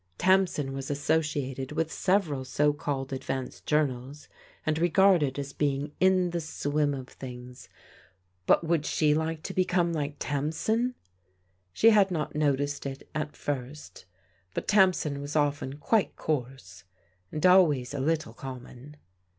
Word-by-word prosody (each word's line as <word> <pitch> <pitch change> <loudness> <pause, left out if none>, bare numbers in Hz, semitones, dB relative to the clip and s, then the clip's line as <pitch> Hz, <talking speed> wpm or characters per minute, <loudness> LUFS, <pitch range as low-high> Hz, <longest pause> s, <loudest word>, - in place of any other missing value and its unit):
Tamsin 180 -7 +2
was 135 0 -5
associated 145 -2 -1
with 160 +1 -1
several 180 -8 +1
so 145 +3 +1
called 135 -2 -3
advanced 130 -1 -5
journals 145 -1 -1 0.4
and 155 0 0
regarded 175 -5 +4
as 140 -1 -5
being 145 0 -1
in 185 -1 +3
the 170 0 -2
swim 145 -2 -1
of 130 -1 -7
things: 125 -1 -10 0.8
but - - +4
would 165 -2 +1
she 155 -1 +2
like 160 +1 -2
to - - -5
become 180 -2 +1
like 150 -2 -2
Tam 145 +1 -2
sin? 230 +9 0 0.8
She 225 - +5
had 205 -3 +5
not 155 -5 -3
noticed 145 -1 0
it 135 0 -8
at 150 -1 -4
first, 140 -2 -6 0.5
but - - -3
Tamsin 185 -8 +3
was 145 +2 -6
often 145 -2 0
quite 210 +7 +1
coarse, 125 - -4 0.5
and 155 - -2
always 155 -9 +5
a 145 - -3
little 150 -4 -1
common. 130 +3 -10
150 Hz, 140 wpm, -28 LUFS, 135-165 Hz, 0.8 s, She